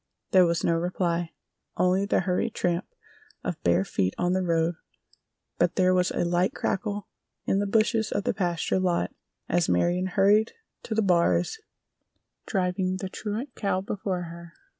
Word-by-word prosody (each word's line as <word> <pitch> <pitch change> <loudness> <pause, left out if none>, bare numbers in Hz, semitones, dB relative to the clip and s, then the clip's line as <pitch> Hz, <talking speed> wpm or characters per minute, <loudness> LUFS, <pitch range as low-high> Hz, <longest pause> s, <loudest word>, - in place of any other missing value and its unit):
There 185 -2 +6
was 170 0 0
no 170 - +3
reply, 170 -1 -1 0.4
only 185 +2 +2
the - - +2
hurried 190 +4 -1
tramp 175 -1 0 0.6
of - - -4
bare 90 +2 +2
feet 95 -1 -1
in 180 0 +1
the 185 - +1
road, 165 -1 +1 0.9
but - - +2
there 185 -1 +4
was 180 0 +2
a - - -1
light 175 +7 +1
crackle 205 0 -2 0.4
in 195 - +2
the 205 - 0
bushes 220 +1 +2
of 200 - -1
the - - 0
pasture 175 -1 0
lot 180 -2 0 0.3
as 175 0 +1
Marion 175 - +2
hurried 205 +4 +3 0.3
to 220 - -3
the 220 - +2
bars 175 - +2 0.9
driving 185 -2 0
the 190 0 -5
truant 220 +7 -5
cow 200 -3 -1
before 190 -2 -3
her. 170 0 -10
185 Hz, 160 wpm, -26 LUFS, 175-200 Hz, 0.9 s, There